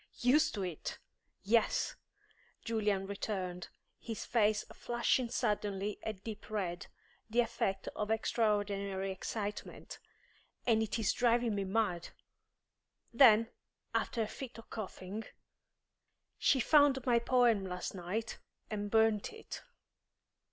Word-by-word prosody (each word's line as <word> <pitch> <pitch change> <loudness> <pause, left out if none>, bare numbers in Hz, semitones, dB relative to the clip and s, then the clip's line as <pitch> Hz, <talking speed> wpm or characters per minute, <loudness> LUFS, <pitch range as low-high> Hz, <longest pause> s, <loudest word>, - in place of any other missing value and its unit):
"Used 295 +5 +4
to 200 - -2
it! 175 -4 -4 0.5
Yes," 220 +3 +2 0.7
Julian 210 -4 0
returned, 190 -3 -4 0.3
his 225 -2 -5
face 215 -2 +2
flushing 240 +1 0
suddenly 210 -4 -1
a 220 - -2
deep 215 +1 -9
red, 185 -5 -3 0.4
the 235 +2 +4
effect 225 -5 -1
of 210 0 -2
extraordinary 205 -3 0
excitement; 205 +2 -5 0.7
"and 225 -2 +4
it 220 0 -1
is 220 -3 +1
driving 240 -1 +2
me 200 -1 -1
mad." 190 -4 0 1.0
Then, 230 -3 +7 0.4
after 230 - 0
a - - -3
fit 255 +2 -8
of 230 - -13
coughing 205 0 -6 1.1
"She 270 - +4
found 285 -2 +5
my 240 -2 +4
poem 235 -4 +3
last 180 -1 -4
night, 195 +5 -4 0.3
and 205 -1 -2
burnt 220 -1 +3
it." 445 0 -8
215 Hz, 115 wpm, -34 LUFS, 200-235 Hz, 1.1 s, Then